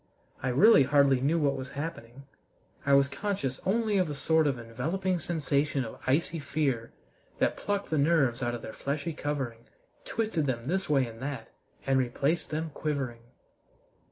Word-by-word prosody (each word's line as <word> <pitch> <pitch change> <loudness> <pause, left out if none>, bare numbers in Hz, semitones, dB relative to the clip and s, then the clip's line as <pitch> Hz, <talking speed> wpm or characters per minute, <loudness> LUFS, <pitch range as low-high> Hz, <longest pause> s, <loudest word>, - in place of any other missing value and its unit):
I 130 - -2
really 140 - +7
hardly 140 -1 +4
knew 150 +5 +2
what 145 -4 +2
was 130 0 -6
happening. 140 -3 -6 0.6
I 140 - +5
was 140 0 +6
conscious 140 -2 -3
only 215 0 +2
of 180 -4 +1
a 145 - -3
sort 160 +2 +2
of 135 -3 0
enveloping 160 +11 -2
sensation 145 -5 0
of 110 - -9
icy 160 +5 +1
fear 140 -6 -1 0.5
that - - +1
plucked 205 -3 -3
the 155 - +2
nerves 140 -5 +3
out 120 -1 -1
of 115 - -8
their 110 - -7
fleshly 145 +4 -3
covering, 135 -6 -4 0.4
twisted 215 -10 -1
them 120 -2 -2
this 190 +2 -1
way 135 -3 +3
and 115 0 -10
that, 140 0 -5 0.4
and 135 -1 +3
replaced 140 +6 0
them 155 +1 -3
quivering. 135 -7 -3
140 Hz, 165 wpm, -29 LUFS, 130-160 Hz, 0.6 s, really